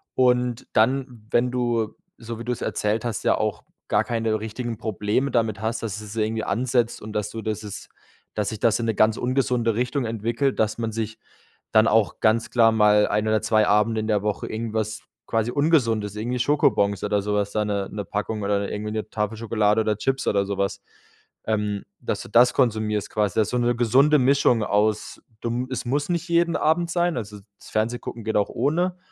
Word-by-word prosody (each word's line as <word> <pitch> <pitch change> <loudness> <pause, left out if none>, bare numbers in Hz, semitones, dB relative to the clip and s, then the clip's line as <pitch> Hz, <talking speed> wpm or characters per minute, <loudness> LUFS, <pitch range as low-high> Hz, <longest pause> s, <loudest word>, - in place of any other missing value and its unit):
Und 125 -2 +2
dann, 125 0 +1
wenn 125 +1 +3
du, 120 -3 -1 0.2
so 115 0 -7
wie - - -5
du 125 - -1
es 120 - -4
erzählt 105 +2 -1
hast, 115 -4 -3
ja - - +3
auch - - -2 0.2
gar 105 +1 +2
keine 115 -2 -1
richtigen 115 +1 -5
Probleme 110 +6 -1
damit 110 -4 0
hast, 110 +1 -2
dass 110 -1 -4
es 105 0 -9
irgendwie 110 0 -1
ansetzt 120 +1 0
und 110 0 -8
dass 105 -1 -2
du 115 - -6
das 110 -1 -3
es 105 -2 -8 0.5
dass 105 -2 -1
sich 110 - -6
das 115 -1 +2
in 115 - -1
'ne 110 - 0
ganz 110 +2 +3
ungesunde 125 -3 0
Richtung 125 +3 -1
entwickelt, 115 +4 -1
dass 110 0 +1
man 115 -1 -2
sich 110 0 -4 0.5
dann 110 0 +5
auch 110 -1 +2
ganz 110 +1 +2
klar 115 -2 +4
mal 105 -1 +4
ein 105 +1 0
oder 110 0 +2
2 110 -1 +2
Abende 105 +2 +2
in 110 - -4
der 105 -2 +1
Woche 105 -1 -2
irgendwas, 110 -1 -3 0.3
quasi, 115 +1 0
Ungesundes, 115 -9 +1
irgendwie 120 +4 -2
Schokobons 110 -7 +2
oder 105 0 +1
sowas, 105 0 -1
da 105 - 0
'ne 100 -2 -2
'ne 105 -1 -5
Packung 105 +1 -3
oder 100 0 0
irgendwie 105 +1 -4
'ne 110 -1 -4
Tafel 105 0 -2
Schokolade 110 -1 +1
oder 105 -1 0
Chips 135 +3 -1
oder 100 -1 +2
sowas 100 0 -2 0.7
ähm, 105 -2 -1 0.2
dass - - -3
du - - -12
das 120 +3 +5
konsumierst 110 -4 0
quasi. 105 -3 -1
Das 110 -1 +2
so 125 - -1
'ne 120 0 +1
gesunde 130 +6 +4
Mischung 130 -3 +3
aus, 105 +1 0 0.2
du 120 +2 -2
es 130 - -3
muss 145 +5 -1
nicht 170 0 -2
jeden 170 0 +2
Abend 165 +2 +1
sein, 175 -2 +1
also 105 -3 -5 0.2
das - - -13
Fernsehgucken 115 +1 -2
geht 110 0 0
auch 105 - +1
ohne 175 +8 0
110 Hz, 200 wpm, -24 LUFS, 105-125 Hz, 0.7 s, dann